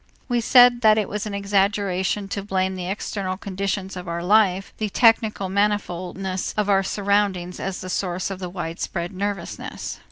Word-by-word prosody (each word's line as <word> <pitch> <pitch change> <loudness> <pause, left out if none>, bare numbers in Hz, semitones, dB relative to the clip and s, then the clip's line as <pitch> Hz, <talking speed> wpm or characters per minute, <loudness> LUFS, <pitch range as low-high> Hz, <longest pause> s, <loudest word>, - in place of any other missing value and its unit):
We 240 -2 +1
said 245 +1 +6
that 215 -2 +6
it 215 - +1
was 210 +1 -4
an 205 - -4
exaggeration 200 -1 0
to 200 - -3
blame 190 -1 -1
the 180 -1 -5
external 190 -1 -3
conditions 195 0 -3
of 180 -1 -7
our 170 0 -3
life, 195 -1 +3
the 215 -1 -2
technical 220 -2 +3
manifoldness 190 -2 -1
of 210 -1 +1
our 195 -1 +4
surroundings 195 -2 0
as 190 -1 -4
the - - -6
source 185 0 -2
of 190 - -5
the 180 -2 -5
widespread 175 0 -4
nervousness. 195 -1 -5
195 Hz, 165 wpm, -23 LUFS, 185-205 Hz, -, said